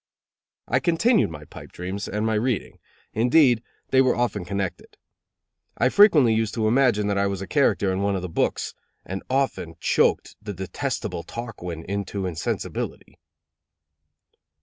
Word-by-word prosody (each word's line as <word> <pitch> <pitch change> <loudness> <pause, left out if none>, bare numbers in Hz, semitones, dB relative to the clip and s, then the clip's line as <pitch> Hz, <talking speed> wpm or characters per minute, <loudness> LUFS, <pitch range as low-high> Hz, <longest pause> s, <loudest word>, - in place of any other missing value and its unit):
I - - +2
continued 205 - +3
my 75 -2 -9
pipe - - -12
dreams, 95 +3 -5
and 105 +2 -2
my 110 - +1
reading; 110 +1 -1 0.3
indeed, 125 0 +4 0.3
they 130 - +6
were 130 -1 +3
often 120 -5 -1
connected. 95 0 -4 0.8
I 125 - +3
frequently 155 - +6
used 110 -1 0
to 110 -2 +1
imagine 120 -3 +3
that 100 -1 0
I 100 - +2
was 100 -1 -3
a 95 - -5
character 100 - +2
in 95 - -1
one 100 0 +1
of 95 - -3
the - - -2
books; 80 - -1 0.3
and 95 +1 -5
often 130 -11 -1
choked - - +1
the 105 -1 -5
detestable 95 -2 -3
Tarquin 90 -4 -7
into 100 0 -3
insensibility. 85 -4 -4
105 Hz, 150 wpm, -24 LUFS, 95-125 Hz, 0.8 s, they